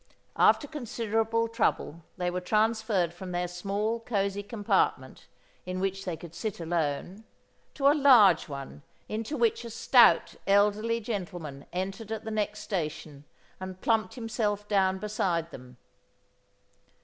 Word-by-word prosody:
After 290 - +4
considerable 230 -5 -1
trouble 225 -7 -1 0.2
they 180 -1 -1
were 180 +1 -3
transferred 215 -3 +1
from 180 +1 -8
their 175 0 -1
small 200 +6 -2
cosy 200 -3 -1
compartment 205 0 -1 0.4
in 185 0 -4
which 195 +1 -2
they 175 -3 -3
could 170 -1 -11
sit 210 +2 -4
alone, 165 +4 -2 0.5
to 275 -1 +2
a 285 - +7
large 240 - +6
one 140 0 -8 0.3
into 225 +7 -4
which 235 -1 +1
a 235 - -7
stout 230 -5 +5
elderly 210 +3 +2
gentleman 175 - -6
entered 195 +4 -4
at 220 0 -4
the 220 - -5
next 210 0 -2
station 155 -7 -5 0.3
and 185 0 -7
plumped 220 -4 +1
himself 215 -3 -2
down 190 -2 +2
beside 185 -5 -1
them. 125 -1 -12
200 Hz, 135 wpm, -28 LUFS, 180-225 Hz, 0.5 s, a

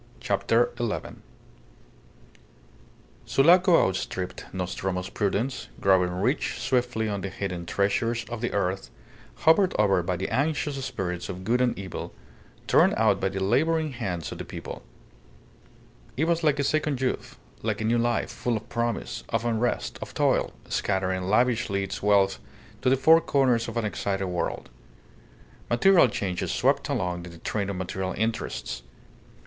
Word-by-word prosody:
CHAPTER 110 +4 +1
ELEVEN 115 -3 -3 2.1
Sulaco 175 - +5
outstripped 95 -1 -4
Nostromo's 90 0 -3
prudence, 105 +6 -1
growing 95 -2 +4
rich 100 - 0
swiftly 120 -3 0
on 100 -2 -2
the 100 - -3
hidden 90 -3 -5
treasures 115 +5 0
of 120 0 -6
the 120 - -1
earth, 95 -1 -1 0.6
hovered 180 +4 +5
over 100 -3 +3
by 90 +1 -1
the 95 +2 -3
anxious 145 -1 -1
spirits 90 -7 -4
of 95 0 -6
good 120 +5 +1
and 125 -1 +1
evil, 95 -3 -6 0.5
torn - - +4
out - - +3
by 95 - 0
the 95 0 -4
labouring 155 +8 +2
hands 90 - -4
of - - -7
the - - -3
people. - - -8 1.4
It 145 - +1
was 170 0 +1
like 150 -2 +3
a 140 - +1
second 150 -2 0
youth, 130 -1 -2 0.2
like - - -1
a - - -2
new 115 +1 +2
life, 120 0 0
full 120 -2 -1
of 110 - -10
promise, 115 -1 -2
of 115 +1 -1
unrest, 120 +1 -1
of - - -8
toil, - - +2 0.2
scattering 95 -2 -1
lavishly 110 -1 +2
its 95 - -5
wealth 100 -1 +3 0.4
to - - +3
the 135 - +4
four 160 +5 +6
corners 125 -6 +2
of 115 0 -5
an 115 - 0
excited 100 -2 -2
world. 90 -8 -3 1.0
Material 170 +6 +5
changes 95 -5 -2
swept - - +1
along 90 -1 -2
in - - -8
the 85 - -12
train 100 +4 -2
of 100 - -3
material 95 +1 -3
interests. 110 - -2
110 Hz, 150 wpm, -26 LUFS, 95-125 Hz, 2.1 s, four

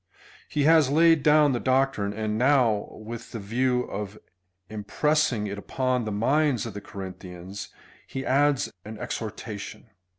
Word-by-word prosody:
He 145 - 0
has 160 -2 +5
laid 165 +1 +5
down 150 0 +5
the 120 - 0
doctrine, 130 -6 +1
and 110 0 -2
now, 125 -4 +3
with 115 +2 -9
the 115 - -4
view 125 +4 0
of 105 -1 -6 0.5
impressing 115 +3 0
it 100 0 -4
upon 130 +2 -1
the 110 - -3
minds 135 +5 +2
of 115 - -6
the 105 - -7
Corinthians, 95 0 -8 0.4
he 135 0 -5
adds 140 +1 +2
an 110 +1 -8
exhorta 110 -1 -5
tion. 110 - -10
120 Hz, 145 wpm, -26 LUFS, 105-135 Hz, 0.5 s, has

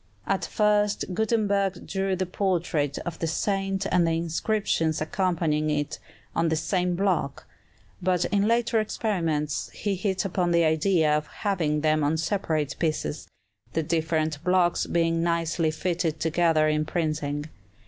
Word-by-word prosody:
At - - 0
first 210 -2 +1
Gutenberg 200 -3 0
drew 195 -1 -1
the 185 +1 -1
portrait 170 -6 -1
of 175 -2 -5
the 165 - -1
saint 195 +3 -1
and 175 -2 +3
the 165 - +1
inscriptions 165 -1 0
accompanying 155 -2 0
it 150 0 -2 0.4
on 165 0 +2
the 160 - +1
same 180 +2 0
block; 175 -7 -1 0.6
but 180 -1 +1
in 205 0 +1
later 230 0 +2
experiments 165 -9 -1
he 205 - -1
hit 190 +1 -1
upon 180 -2 0
the 170 0 +3
idea 160 0 +3
of 150 -1 -2
having 160 -7 -1
them 155 0 +2
on 150 +3 +1
separate 160 -5 -1
pieces, 155 -1 -2 0.5
the 160 - 0
different 155 -1 -1
blocks 180 -1 +2
being 165 -1 +1
nicely 170 -1 +1
fitted 165 -1 -1
together 160 -1 +2
in 155 0 +1
printing. 150 -3 -2
170 Hz, 140 wpm, -26 LUFS, 155-190 Hz, 0.6 s, and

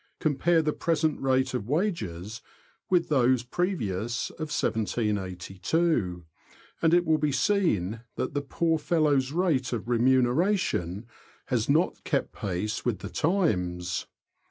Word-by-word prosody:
Compare 160 +3 +2
the 150 -1 0
present 160 -2 0
rate 130 0 +1
of 120 -3 -3
wages 115 - -2 0.5
with 180 -2 +2
those 130 -4 +3
of 125 - -29
1782, 105 - -1 0.6
and 165 - +4
it 175 0 +3
will 160 -1 +3
be 150 -1 +1
seen 125 - +1
that - - -3
the 145 - 0
poor 160 +3 0
fellow's 145 -5 +2
rate 155 -6 +1
of 120 -2 -3
remuneration 125 - +2 0.4
has - - -1
not - - +2
kept - - -1
pace 105 +3 -3
with 120 -4 0
the - - -7
times. 90 - 0
130 Hz, 120 wpm, -27 LUFS, 105-160 Hz, 0.6 s, and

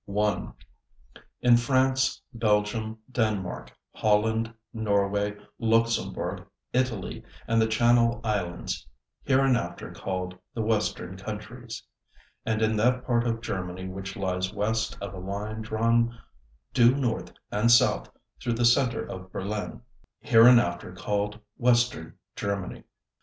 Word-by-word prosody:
1. 105 +1 -1 0.9
_In 120 -1 +6
France, 130 +2 +2
Belgium, 110 0 0
Denmark, 110 -7 -1 0.2
Holland, 110 +2 +2 0.2
Norway, 100 -2 0 0.2
Luxembourg, 115 0 0 0.3
Italy, 125 -6 -1 0.2
and 115 0 +3
the 110 - +3
Channel 120 +1 +3
Islands 95 -6 -2 0.4
(hereinafter 130 -10 +1
called 90 -1 -4 0.2
the 115 - -1
"Western 105 -4 -1
Countries") 110 +4 -7 0.6
and 110 0 +1
in 110 0 +2
that 125 +4 +2
part 120 -1 +1
of 115 -1 -1
Germany 95 -3 -4
which 95 0 -6
lies 95 -1 -1
west 110 +1 -1
of 100 0 -6
a 95 - -7
line 100 +4 -4
drawn 115 +2 +1 0.6
due 120 +1 +6
north 125 -5 -1 0.2
and 105 +3 +2
south 120 - +4 0.3
through 120 - 0
the 120 +1 +1
center 120 +1 +3
of 95 0 -8
Berlin 105 +5 -4 0.4
(hereinafter 115 -8 +5
called 105 +3 -2 0.2
"Western 120 -8 +2 0.2
Germany"). 100 -2 -4
110 Hz, 115 wpm, -27 LUFS, 100-120 Hz, 0.9 s, In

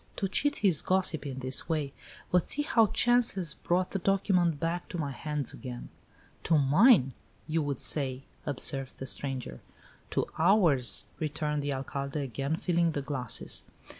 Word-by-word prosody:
To 195 - -2
cheat 290 +9 +1
his 175 -7 +4
gossip 185 -5 0
in 135 -2 -6
this 130 +5 -2
way! 150 -4 -2 0.4
But 180 -2 +2
see 295 - +3
how 230 -6 +3
chance 240 +2 +3
has 175 -5 -1
brought 180 +1 -1
the 195 - -2
document 180 -4 +1
back 170 +2 -3
to 175 - -5
my 145 -4 -3
hands 150 0 -3
again!" 125 -2 -8 0.6
"To 160 - +3
mine, 145 - +4 0.3
you 160 +1 -1
would 145 -3 -3
say," 135 -2 0 0.2
observed 135 -1 +1
the 135 - -6
stranger. 130 - -2 0.5
"To - - -1
ours!" 160 - +4
returned 150 -1 -2
the 145 0 -3
Alcalde, 140 +2 -4
again 135 +4 -3
filling 170 -3 0
the 145 - -3
glasses. 130 -5 -3
150 Hz, 160 wpm, -29 LUFS, 135-180 Hz, 0.6 s, his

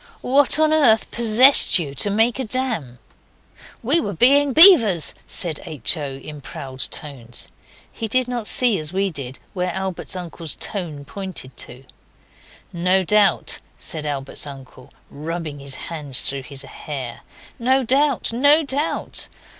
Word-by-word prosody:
What 275 +2 +3
on 310 0 +2
earth 245 -8 +3
possessed 235 +4 +6
you 150 -6 -5
to 170 +9 +1
make 225 +5 0
a - - -2
dam?' 225 - -3 0.9
'We 290 +9 +3
were 205 - -5
being 275 - +3
beavers,' 245 - +7
said 165 -4 -3
H. 150 -3 -1
O., 145 -4 -6
in 145 +2 -11
proud 135 -1 -10
tones. 125 -5 -4 0.4
He 225 - -6
did 255 +3 -1
not 240 -3 -4
see 240 -7 +2
as 155 0 -3
we 195 +1 -2
did 135 -4 -7 0.2
where 180 -1 -3
Albert's 190 +1 -5
uncle's 170 -3 -4
tone 160 -8 -4
pointed 185 -8 -9
to. 130 +2 -7 0.9
'No 180 +2 0
doubt,' 200 +1 +1 0.2
said 155 -2 -5
Albert's 140 0 -4
uncle, 135 -2 -13 0.2
rubbing 155 0 -7
his 140 -1 -4
hands 145 -6 -1
through 140 0 0
his 140 -1 -9
hair. 135 -4 -8 0.4
'No 260 +3 +1
doubt! 270 0 0
no 285 +6 +4
doubt! 285 +2 -3
185 Hz, 145 wpm, -20 LUFS, -, 0.9 s, beavers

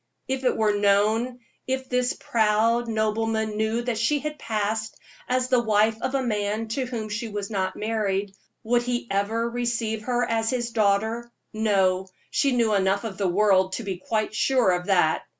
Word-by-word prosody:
If 265 0 -2
it 250 - +2
were 215 -1 +2
known 215 +5 +2 0.3
if 260 0 -2
this 250 0 +1
proud 225 +2 +2
nobleman 220 0 0
knew 220 +2 0
that 240 -3 -2
she 260 +7 +2
had 300 +1 -5
passed 220 0 -2 0.3
as 255 0 +1
the 250 -2 +4
wife 220 0 +2
of 260 +1 -1
a 270 - +1
man 215 -1 -1
to 255 +3 -2
whom 230 -3 -4
she 215 +2 -4
was 205 0 -5
not 190 -2 -1
married, 205 -3 -1 0.3
would 240 +2 +2
he 245 0 -2
ever 215 +4 0
receive 235 -2 -2
her 245 -1 0
as 225 -1 0
his 240 -2 -1
daughter? 220 +2 +1 0.2
No; 190 -4 +1 0.2
she 280 - +2
knew 230 -3 +2
enough 195 +1 +2
of 210 -4 -6
the 195 - +1
world 190 0 +3
to 235 - -3
be 195 -3 -4
quite 215 +4 -2
sure 250 -2 +3
of 180 0 -1
that. 175 -5 +3
220 Hz, 180 wpm, -25 LUFS, 205-240 Hz, 0.3 s, the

